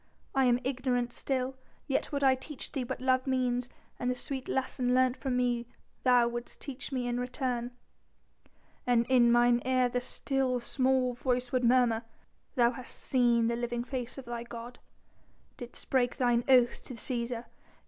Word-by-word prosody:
I 270 -1 +3
am 245 -1 +4
ignorant 250 -2 -1
still, 265 -1 -2 0.3
yet 275 - -1
would 280 -1 -1
I 265 -1 +6
teach 260 +2 -7
thee 270 -4 -2
what 245 - -5
love 255 0 +2
means 250 -2 0 0.3
and 245 - -1
the 250 - 0
sweet 265 +1 -4
lesson 255 -1 0
learnt 255 -1 +3
from 260 -3 -2
me 240 -1 0 0.3
thou 245 -2 +5
wouldst 240 0 -5
teach 275 +1 -6
me 250 -2 -1
in 245 0 -1
return." 250 -1 -2 1.2
"And 240 -1 +3
in 245 -2 +5
mine 240 0 +4
ear 255 -1 +2
the 245 0 -1
still, 260 0 -1
small 255 0 +1
voice 245 0 -1
would 255 -1 +1
murmur: 240 -2 +4 0.5
'Thou 240 -1 +4
hast 250 +1 -8
seen 240 -3 +2
the 235 +1 +1
living 240 0 -2
face 250 -1 -5
of 270 - -8
thy 235 0 -4
God, 235 +1 -9 0.8
didst 245 0 -10
break 245 -2 +2
thine 240 -2 +2
oath 250 -2 +4
to 255 - -8
Cæsar! 235 -1 -3
250 Hz, 170 wpm, -30 LUFS, 240-260 Hz, 1.2 s, I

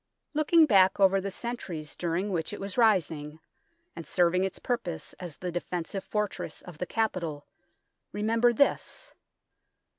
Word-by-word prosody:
Looking 310 +2 +5
back 195 -7 +5
over 195 0 +5
the 200 - -3
centuries 190 -8 -6
during 175 +4 -1
which 170 +1 -2
it - - -6
was 195 -1 -5
rising, 160 -9 +2 0.6
and 165 - -8
serving 180 +2 +3
its 190 - -2
purpose 175 -10 -3
as 175 -5 -7
the 180 -1 -4
defensive 175 +2 -4
fortress 210 -1 -3
of 175 -4 -11
the 180 - -3
capital, 170 -10 -2 0.7
remember 225 +4 +2
this. 285 - 0
190 Hz, 140 wpm, -28 LUFS, 170-220 Hz, 0.7 s, Looking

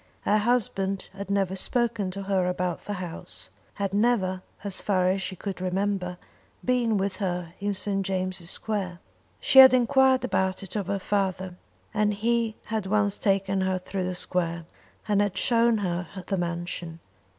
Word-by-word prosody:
Her 210 - +3
husband 200 -4 0
had 200 0 -7
never 195 -2 +1
spoken 230 -1 0
to 195 +2 -5
her 190 -2 +1
about 180 -1 -1
the 205 - -5
house, 180 -4 -6 0.2
had 200 -1 -2
never, 200 -4 +2 0.2
as 200 -2 -3
far 185 -3 +2
as 190 +1 +1
she 190 - -4
could 190 0 -5
remember, 185 -1 -1 0.5
been 240 -4 +2
with 195 -1 -1
her 175 -3 -3
in 205 0 -1
St. 195 0 -1
James' 185 -2 -3
Square. 195 -5 -3 0.4
She 265 - +6
had 260 -1 +11
enquired 260 +1 +4
about 190 -6 0
it 195 - -7
of 200 -4 -2
her 200 0 0
father, 190 -2 -1 0.4
and 210 -1 +2
he 230 +1 +1
had 215 -3 -2
once 205 0 +1
taken 195 -1 +1
her 190 0 +1
through 185 +1 -3
the 185 0 -2
square, 170 -2 -2 0.4
and 205 -1 +3
had 205 -2 0
shown 235 -1 +3
her 180 -3 -2 0.2
the 195 - -1
mansion. 170 -1 -4
195 Hz, 165 wpm, -26 LUFS, 185-210 Hz, 0.5 s, had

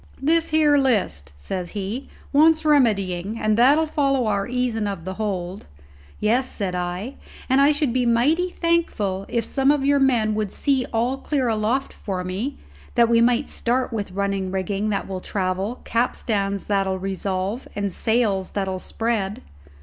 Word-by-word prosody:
"This 325 +4 +2
here 300 -2 +4
list," 185 - 0
says 180 - -5
he, 205 +7 -4 0.2
"wants 315 +2 +5
remedying 210 - +2
and 215 0 +2
that'll 280 +7 +5
follow 275 -4 +1
our 200 -2 0
easin' 245 -4 -1
of 195 -5 -5
the 190 - -4
hold." 190 - -4 0.5
"Yes," 245 +5 +1
said 195 -4 -3
I, 180 +8 -4 0.3
"and 265 +1 +4
I 285 +2 +6
should 290 -4 0
be 250 -1 +1
mighty 295 +10 +2
thankful 240 - 0
if 235 - -1
some 270 0 +1
of 290 -2 +2
your 285 0 +4
men 240 -6 +2
would 210 -2 -2
see 270 -3 0
all 240 +4 0
clear 270 -3 -1
aloft 225 +5 0
for 185 -3 -4
me, 195 +10 -3 0.4
that 235 -2 +4
we 230 0 +4
might 245 +3 +3
start 250 +1 -1
with 200 -4 -4
running 195 -1 -1
rigging 195 +2 -2
that 200 -2 -2
will 190 -1 -5
travel, 190 +4 -2
capstans 205 -4 -1
that'll 195 -2 0
revolve, 195 +4 -3
and 200 -2 -2
sails 220 -5 0
that'll 190 -2 -2
spread." 215 -2 -2
220 Hz, 160 wpm, -23 LUFS, 195-265 Hz, 0.5 s, I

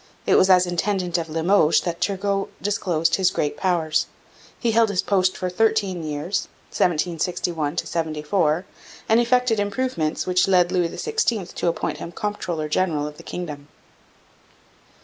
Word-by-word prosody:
It - - +3
was 190 - +5
as 185 -1 +6
intendant 180 0 -1
of 165 -1 -5
Limoges 165 +1 +3
that 170 0 -4
Turgot 200 0 -1
disclosed 185 -6 0
his 190 -2 +3
great 150 -5 -2
powers. 160 -5 0 0.5
He 235 - +1
held 225 0 +4
his 185 -3 0
post 185 -2 +1
for 185 - -2
thirteen 195 -2 +1
years 155 +5 -2 0.2
(1761 170 -2 -1
74), 160 +1 0 0.4
and 225 +1 +4
effected 240 -2 +2
improvements 205 -6 -1
which 180 0 +2
led 180 -2 +4
Louis 175 -2 +1
XVI 235 - -2
to - - -2
appoint 170 - -1
him 170 - -7
comptroller 180 -7 -3
general 155 -2 0
of 150 0 -7
the - - -11
Kingdom. 150 -5 -7
180 Hz, 145 wpm, -23 LUFS, 165-200 Hz, 0.5 s, as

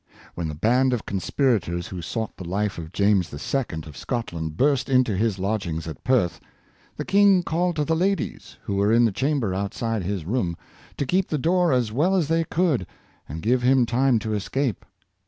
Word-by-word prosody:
When 85 -2 -3
the 75 - -5
band 125 - +2
of 120 - -2
conspirators 95 - 0
who 90 -2 -6
sought 110 +6 -4
the - - -8
life 95 +2 -2
of 80 -1 -8
James 100 -3 +2
II., 80 - -3
of 75 -3 -11
Scotland, 85 - -4
burst 135 -1 +2
into 125 -5 +3
his 105 0 0
lodgings 95 -5 -2
at 80 -4 -8
Perth, 125 -9 +1 0.6
the - - -4
king 195 -1 +5
called 175 +1 0
to 150 -1 0
the 160 - +1
ladies, 190 0 -2
who 100 - -2
were 100 +2 +3
in 120 +1 +5
the 115 - +2
chamber 130 -2 0
outside 100 +3 -2
his 95 -2 -3
room, 90 -5 -1 0.4
to 140 - -1
keep 185 +7 +1
the 155 - -1
door 175 +3 +2
as 125 -4 +1
well 160 - +2
as 165 -5 +1
they 165 0 +2
could, 160 - 0 0.4
and 80 +3 -6
give 125 +3 +2
him 125 0 +4
time 125 +1 +2
to 110 0 -3
escape. 115 +2 -2
115 Hz, 190 wpm, -24 LUFS, 95-140 Hz, 0.6 s, king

